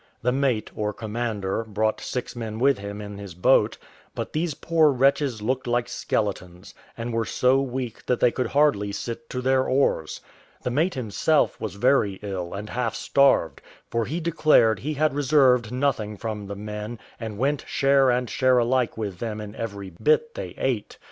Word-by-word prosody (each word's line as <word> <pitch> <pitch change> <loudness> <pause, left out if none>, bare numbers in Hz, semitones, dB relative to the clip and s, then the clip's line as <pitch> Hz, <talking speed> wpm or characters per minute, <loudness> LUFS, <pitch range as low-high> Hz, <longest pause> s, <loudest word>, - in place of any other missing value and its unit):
The 125 - +2
mate, 130 -5 0
or 105 0 -2
commander, 110 -2 -3
brought 110 0 -1
six 125 -1 -4
men 110 -2 -5
with 135 0 +3
him 100 +1 -6
in 105 -1 -8
his 100 -4 -9
boat; 90 - +3 0.4
but - - -5
these 155 -1 -1
poor 160 -2 +3
wretches 135 -3 +1
looked 130 +3 -1
like 120 0 +1
skeletons, 95 -2 -3 0.2
and 115 0 -4
were 115 0 +1
so 130 +4 +2
weak 125 -3 -5
that 125 - +1
they 125 - +4
could 125 -1 -1
hardly 140 -7 +2
sit 120 +9 -6
to 125 - -3
their 130 0 +3
oars. 130 - +1 0.4
The 125 - -1
mate 160 +7 +1
himself 130 +6 +1
was 105 -4 -4
very 105 -3 +2
ill, 95 -4 -4
and 105 +2 -6
half 120 -3 -1
starved; 135 - +2 0.3
for 115 -1 0
he 155 +9 -3
declared 155 - +3
he 150 +6 -3
had 155 0 +2
reserved 130 -5 +3
nothing 125 -6 -1
from 105 -2 -5
the 100 - -5
men, 105 +3 -6 0.2
and 110 -3 -5
went 140 +4 0
share 135 -1 +3
and 125 0 +1
share 130 +2 +3
alike 125 0 +1
with 100 -5 -4
them 110 -2 -4
in 105 -1 -7
every 100 -4 -6
bit 465 0 +1
they - - -6
ate. - - -2
120 Hz, 180 wpm, -25 LUFS, 105-135 Hz, 0.4 s, they